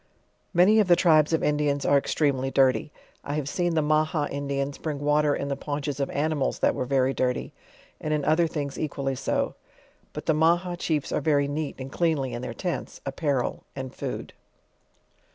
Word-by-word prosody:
Many 190 +5 +5
of 210 - +3
the 175 - +7
tribes 155 -4 +4
of 160 - +1
Indians 145 -1 +1
are - - +4
extremely 140 -1 +1
dirty. 135 +2 +2 0.3
I 145 - -3
have 150 -3 -2
seen 175 +2 0
the 155 - +2
Maha 155 0 +1
Indians 140 0 -3
bring 155 -3 -3
water 150 0 +2
in 140 - -3
the 140 - -1
paunches 145 0 -4
of 140 - -1
animals 145 -1 0
that - - +2
were 125 - -2
very 135 0 +2
dirty, 125 -1 -1 0.5
and 155 - -3
in 150 -2 0
other 160 +2 +3
things 145 -3 -4
equally 140 -3 -2
so. 135 +1 -1 0.6
But - - -7
the 160 - +3
Maha 170 +3 +2
chiefs 155 -4 -1
are - - 0
very 145 -3 +2
neat 145 +1 -3
and 135 0 -7
cleanly 155 -6 0
in 120 - -4
their 125 -2 -5
tents, 175 -2 -4
apparal>and 135 -3 -3
food. - - -5
145 Hz, 180 wpm, -26 LUFS, 140-155 Hz, 0.6 s, the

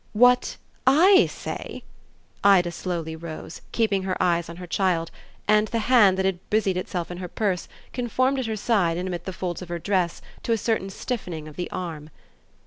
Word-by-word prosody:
"What 245 +3 +4 0.3
'I' 365 +8 +7
say?" - - -6 0.6
Ida 190 -3 +5
slowly 170 -3 -4
rose, 160 0 -8
keeping 215 -4 +1
her 190 -1 -2
eyes 170 -1 +1
on 170 - -7
her 180 +1 -8
child, 175 -2 0 0.4
and 210 0 +4
the 230 - -2 0.2
hand 200 -6 +6
that 190 - +1
had 190 -2 0
busied 210 -3 +2
itself 180 -1 -3
in 175 - -6
her 180 - -4
purse 185 -2 -1 0.3
conformed 255 +2 +1
at 255 - -2
her 220 - -2
side 195 -7 +1
and 180 +1 -2
amid 175 -2 -4
the 190 - -3
folds 180 -1 -4
of 180 - -8
her 175 - -2
dress 180 0 0 0.2
to 230 - 0
a - - +2
certain 220 -3 -1
stiffening 180 -8 -5
of 150 - -11
the 175 - -4
arm. 160 -4 -5
185 Hz, 190 wpm, -25 LUFS, 175-220 Hz, 0.6 s, I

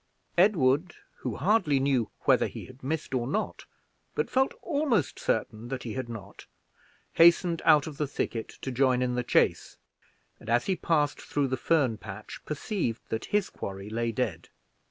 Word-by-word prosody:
Edward, 170 -4 +3 0.2
who 125 -5 -4
hardly 160 -4 +2
knew 130 -5 +1
whether - - +4
he - - -8
had 130 +1 -15
missed 145 +1 -3
or 120 -2 0
not, 210 +11 -2 0.5
but - - -1
felt 265 +1 +2
almost 285 - 0
certain 110 +1 -1
that 130 0 -4
he 115 - -5
had 130 -2 -4
not, 105 -4 -9 0.7
hastened 170 0 +5
out 150 -2 +6
of 155 -3 -7
the 150 - -1
thicket 115 -4 -3
to 130 - -2
join 125 0 +2
in 125 -1 0
the 125 - 0
chase; 120 - +1 0.6
and, 110 - -10
as 120 +1 +3
he 190 - +1
passed 150 -4 +1
through 140 -2 -1
the 130 - 0
fern 130 -5 +1
patch, 105 0 -9
perceived 150 - -2
that 110 - -2
his 205 -2 0
quarry 100 +1 -6
lay 115 +1 -1
dead. - - -3
135 Hz, 170 wpm, -28 LUFS, 120-165 Hz, 0.7 s, out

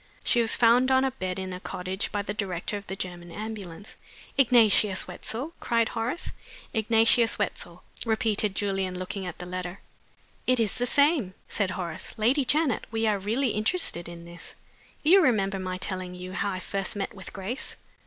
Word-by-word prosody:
She 240 - +4
was 225 - +4
found 245 +2 +5
on 260 0 +4
a 265 - +1
bed 185 -7 -4
in 190 -1 -4
a 180 - -5
cottage 185 +1 -3
by 205 -1 -1
the 205 - -3
director 195 -2 -2
of 205 -1 -6
the 190 - -4
German 175 -2 -6
ambulance 205 -2 -7 0.2
" - - -20
"Ignatius 220 -6 +5
Wetzel?" 270 +9 -5
cried 230 -1 +1
Horace. 235 +9 -3 0.4
"Ignatius 225 +1 +4
Wetzel," - - -4 0.2
repeated 220 -3 +1
Julian, 195 -2 -1
looking 185 +1 -4
at 175 - -6
the 180 - -7
letter. 180 +1 -5 0.7
"It 255 -1 +4
is 220 -3 +1
the 245 0 +1
same!" 285 - +3
said 200 -3 -1
Horace. 170 -3 -5
"Lady 250 +6 +3
Janet, 295 -2 +2
we 225 0 0
are 210 -2 +2
really 230 +7 0
interested 215 - 0
in 170 0 -10
this. 170 +1 -10 0.5
You 365 +6 +7
remember 200 - +2
my 185 -1 -3
telling 185 -1 -3
you 180 +1 -7
how 200 - 0
I 185 - -3
first 195 +2 -3
met 200 +2 -3
with 190 -3 -10
Grace? 220 +8 -4
205 Hz, 180 wpm, -27 LUFS, 185-235 Hz, 0.7 s, You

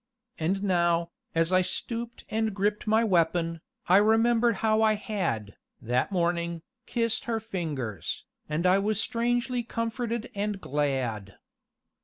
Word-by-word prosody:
And 190 +5 0
now, 170 -3 +2 0.2
as 165 +1 +2
I 185 - +6
stooped 230 +5 -4
and 220 -2 0
gripped 205 +2 0
my 220 +2 +4
weapon, 165 -4 +1 0.3
I 185 - +7
remembered 225 +2 +4
how 215 0 +3
I 220 -1 +5
had, 115 - -3 0.2
that 125 - 0
morning, 170 -2 0 0.2
kissed 230 -2 0
her 230 -1 0
fingers, 155 - -4 0.2
and 155 +4 -1
I 185 +2 +5
was 210 +1 +1
strangely 240 +2 0
comforted 230 0 -3
and 205 0 -2
glad. 130 - -2
195 Hz, 130 wpm, -28 LUFS, 165-225 Hz, 0.3 s, I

